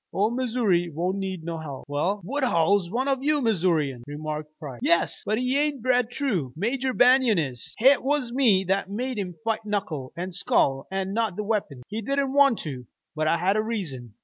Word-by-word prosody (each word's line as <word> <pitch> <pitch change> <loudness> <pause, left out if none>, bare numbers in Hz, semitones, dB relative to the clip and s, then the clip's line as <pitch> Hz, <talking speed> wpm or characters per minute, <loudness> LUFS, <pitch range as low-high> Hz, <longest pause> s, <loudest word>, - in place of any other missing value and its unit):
Ole 210 +4 +1
Missoury 230 -8 +1
won't 180 +5 -1
need 190 -3 -4
no 165 0 -4
help." 145 -4 -7
"Well, 170 +8 -1
Woodhull's 200 - +1
one 250 +7 -1
of 270 -2 +1
you 295 +1 +2
Missourians," 165 - +1
remarked 150 +1 -5
Price. 135 -6 -8
"Yes, 170 - +2
but 215 - +1
he 255 +3 +1
ain't 290 -5 -1
bred 250 -2 +2
true. 210 - -2
Major 250 - -1
Banion 250 -3 +5
is. 130 -7 -3
Hit 265 +4 +5
was 265 -3 -1
me 230 -8 +4
that 195 +1 0
made 245 +3 -3
him 180 -3 -4
fight 225 -1 -1
knuckle 195 -11 -3
an' 180 +2 -4
skull 135 -6 +1
an' 190 0 -2
not 225 -4 0
with 210 - -3
weapons. 200 - -2
He 215 +3 -4
didn't 275 +3 -1
want 275 -4 +5
to, 130 -6 -7 0.3
but 155 0 0
I 165 - +3
had 185 +4 +1
a 215 - +2
reason. 155 - -5
200 Hz, 195 wpm, -25 LUFS, 160-245 Hz, 0.3 s, Banion